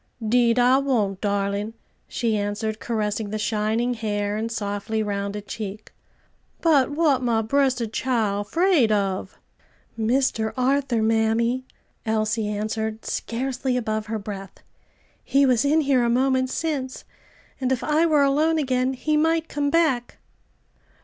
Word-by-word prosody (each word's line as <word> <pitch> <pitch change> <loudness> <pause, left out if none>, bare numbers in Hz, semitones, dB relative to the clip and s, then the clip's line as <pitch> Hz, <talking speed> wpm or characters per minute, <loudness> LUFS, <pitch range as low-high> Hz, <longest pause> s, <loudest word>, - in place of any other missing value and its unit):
"'Deed 235 +1 +3
I 250 +2 +5
won't, 215 -9 0
darling" 200 +1 -1 0.3
she 230 -3 -1
answered, 210 +1 -2
caressing 215 -2 -2
the 215 - -3
shining 220 +3 0
hair, 205 -3 -2
and 225 +2 -3
softly 210 0 -2
rounded 200 0 -3
cheek. 210 0 -6 0.7
"But 295 -6 +3
what 290 -3 +2
my 230 -3 +1
bressed 260 0 +1
chile 220 -6 0
'fraid 325 - +2
of?" 195 -2 -1 0.6
"Mr. 225 -1 0
Arthur, 260 -3 +1
mammy," 225 +3 +1 0.4
Elsie 220 -1 0
answered 215 +1 -3
scarcely 255 +1 -2
above 215 -2 -2
her 220 +1 -2
breath. 200 -2 -8 0.6
"He 275 0 +3
was 250 -3 +3
in 300 +3 +3
here 270 -4 +2
a 235 - +1
moment 260 +1 +2
since, 275 -4 -3 0.6
and 260 -1 -1
if 260 - 0
I 310 +2 +2
were 300 -3 +4
alone 305 +4 +2
again 260 -3 0
he 305 +4 -1
might 325 +1 +1
come 285 0 -1
back." 285 -7 +1
235 Hz, 135 wpm, -24 LUFS, 215-265 Hz, 0.7 s, I